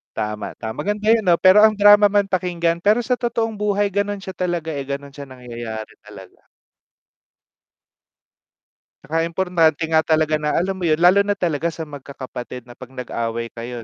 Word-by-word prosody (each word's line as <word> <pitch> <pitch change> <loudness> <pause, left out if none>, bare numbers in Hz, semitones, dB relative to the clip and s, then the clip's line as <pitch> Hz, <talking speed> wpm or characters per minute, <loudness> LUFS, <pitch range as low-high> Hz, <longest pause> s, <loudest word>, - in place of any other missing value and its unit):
Tama, 105 -1 -4
tama 110 0 -5
maganda 210 +1 -1
yun 225 -2 +3
'no 175 -2 +5
pero 200 +3 +7
ang 215 - +4
drama 205 0 +6
man 200 -1 +2
pakinggan 175 -2 0
pero 215 +4 +4
sa 250 +1 -1
totoong 225 -3 -2
buhay 205 -1 0
ganun 205 0 -2
siya 190 - -8
talaga 175 -3 -2
eh, 140 -3 -4
ganun 140 +1 -5
siya 140 0 -10
nangyayari 120 -4 -8
talaga. - - -14 2.6
'Tsaka 165 +2 -1
importante 165 -3 +1
nga 160 - +5
talaga 155 -1 +1
na 150 0 -1
alam 190 +2 -1
mo 175 - -1
yun? 155 - +3
Lalo 180 +4 +5
na 205 - +1
talaga 170 -4 -1
sa 165 0 -5
magkakapatid 130 -4 -9
na 120 - -15
'pag 125 +1 -12
nag-away 115 -1 -4
kayo 120 0 -7
165 Hz, 170 wpm, -20 LUFS, 135-200 Hz, 2.6 s, pero